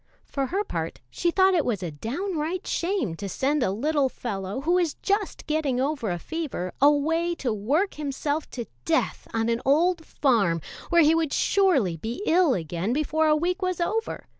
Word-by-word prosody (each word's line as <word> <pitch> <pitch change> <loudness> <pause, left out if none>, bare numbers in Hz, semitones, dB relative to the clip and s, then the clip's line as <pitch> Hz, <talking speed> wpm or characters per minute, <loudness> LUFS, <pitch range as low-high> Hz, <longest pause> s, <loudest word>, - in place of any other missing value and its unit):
For 275 -2 -2
her 390 +7 -1
part, - - -4
she 345 - 0
thought 380 +2 +4
it 335 -4 +3
was 210 -6 -1
a 170 - -3
downright 320 - -3
shame 345 - -1
to 200 +1 -5
send 280 +8 0
a 245 - +2
little 275 +7 +1
fellow, 200 -1 -4
who 320 +5 0
was 350 -3 +2
just 405 0 -2
getting 300 -5 0
over 270 -5 -1
a 175 - -1
fever, 280 - -4
away 320 +4 +3
to 250 -8 -2
work 285 - 0
himself 295 +1 -3
to 240 -3 -5 0.2
death 325 -1 0
on 225 0 0
an 235 0 0
old 330 +5 +3
farm, 220 - +2 0.3
where 340 -1 +5
he 305 +2 +5
would 325 -3 0
surely 280 - +2
be 230 - -5
ill 330 -5 +4
again 170 +6 -2
before 310 +2 +1
a 305 - +5
week 360 +5 -1
was 365 -1 -1
over. 445 +6 -2
300 Hz, 185 wpm, -26 LUFS, 235-345 Hz, 0.3 s, where